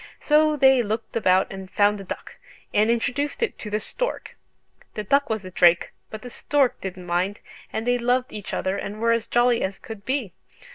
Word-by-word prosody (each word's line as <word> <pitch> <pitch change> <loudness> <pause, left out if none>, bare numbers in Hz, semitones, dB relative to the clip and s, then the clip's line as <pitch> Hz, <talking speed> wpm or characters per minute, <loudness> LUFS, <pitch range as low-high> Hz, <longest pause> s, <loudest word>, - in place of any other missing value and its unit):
So 305 0 +3
they 265 -2 +6
looked 220 0 -4
about 190 -4 +3
and 190 -1 -8
found 205 0 +2
a - - -8
duck, 185 - -8 0.4
and 215 +2 +3
introduced 255 - 0
it 460 - -2
to 210 - -6
the 210 +1 0
stork. - - -4 0.6
The 210 - -3
duck 280 +7 +2
was 220 -3 -2
a 185 - -8
drake, 175 -1 +4 0.2
but 215 +1 -8
the 250 - -7
stork 280 -1 +1
didn't 185 -1 -6
mind, 180 +3 -1 0.3
and 220 - -3
they 245 0 +2
loved 250 +1 0
each 205 -2 -6
other 190 +1 -1
and 205 +1 -5
were 230 +1 +2
as 230 -1 0
jolly 240 0 +3
as 190 +1 -2
could 220 -3 -10
be. 255 -8 -2
220 Hz, 200 wpm, -24 LUFS, 195-250 Hz, 0.6 s, they